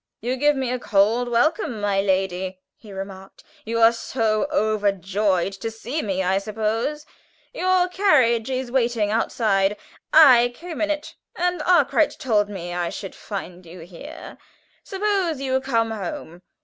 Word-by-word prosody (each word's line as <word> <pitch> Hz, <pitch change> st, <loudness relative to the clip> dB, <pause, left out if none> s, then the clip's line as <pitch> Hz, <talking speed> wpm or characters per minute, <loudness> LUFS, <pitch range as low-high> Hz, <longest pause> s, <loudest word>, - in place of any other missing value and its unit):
"You 245 Hz, +4 st, -2 dB
give 295 Hz, +3 st, +2 dB
me 260 Hz, -2 st, -2 dB
a 250 Hz, -, -2 dB
cold 225 Hz, +3 st, +2 dB
welcome, 245 Hz, 0 st, +1 dB
my 200 Hz, -1 st, +1 dB
lady," 190 Hz, -1 st, -1 dB, 0.2 s
he 215 Hz, -, -15 dB
remarked. 195 Hz, 0 st, -9 dB, 0.2 s
"You 230 Hz, +1 st, -2 dB
are 225 Hz, 0 st, +7 dB
so 225 Hz, 0 st, -1 dB
overjoyed 200 Hz, -, 0 dB
to 210 Hz, +4 st, -5 dB
see 240 Hz, +7 st, -4 dB
me, 190 Hz, -5 st, -2 dB
I 190 Hz, +2 st, +1 dB
suppose. 225 Hz, +8 st, -2 dB, 0.5 s
Your 370 Hz, -5 st, +2 dB
carriage 265 Hz, -, +2 dB
is 255 Hz, -1 st, -3 dB
waiting 235 Hz, -5 st, +1 dB
outside. 210 Hz, -3 st, +1 dB, 0.3 s
I 250 Hz, -6 st, +7 dB
came 340 Hz, +2 st, -7 dB
in 310 Hz, -, +1 dB
it, 300 Hz, 0 st, -3 dB, 0.2 s
and 355 Hz, -1 st, -1 dB
Arkwright 315 Hz, -3 st, +3 dB
told 210 Hz, -5 st, +1 dB
me 175 Hz, -3 st, -6 dB
I 175 Hz, -1 st, -2 dB
should 195 Hz, +1 st, -7 dB
find 185 Hz, -3 st, -7 dB
you 170 Hz, +1 st, -12 dB
here. 175 Hz, -, -11 dB, 0.4 s
Suppose 390 Hz, -6 st, -1 dB
you 265 Hz, -1 st, 0 dB
come 230 Hz, -4 st, 0 dB
home. 180 Hz, -4 st, -6 dB
225 Hz, 150 wpm, -23 LUFS, 195-275 Hz, 0.5 s, are